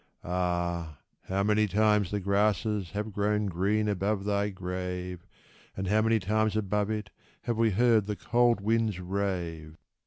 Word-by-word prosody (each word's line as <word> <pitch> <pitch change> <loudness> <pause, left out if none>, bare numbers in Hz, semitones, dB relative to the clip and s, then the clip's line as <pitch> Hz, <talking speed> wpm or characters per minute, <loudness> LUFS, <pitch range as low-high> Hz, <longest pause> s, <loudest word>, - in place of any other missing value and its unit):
Ah! 85 -3 -2 0.3
how 95 +1 0
many 105 +1 +3
times 105 -1 +2
the 105 - -1
grasses 100 0 +1
have 105 +4 -4
grown 105 +1 +1
green 100 +4 0
above 100 0 -1
thy 100 0 +1
grave, 90 -1 -5 0.5
And 95 0 -3
how 105 +2 +3
many 110 +1 +3
times 110 +2 0
above 105 0 0
it 105 -2 -3 0.3
have 120 -2 -1
we 115 -1 +4
heard 110 0 +3
the 105 - -2
cold 120 0 +2
winds 110 -2 +1
rave 90 -4 -3
100 Hz, 150 wpm, -29 LUFS, 90-105 Hz, 0.5 s, we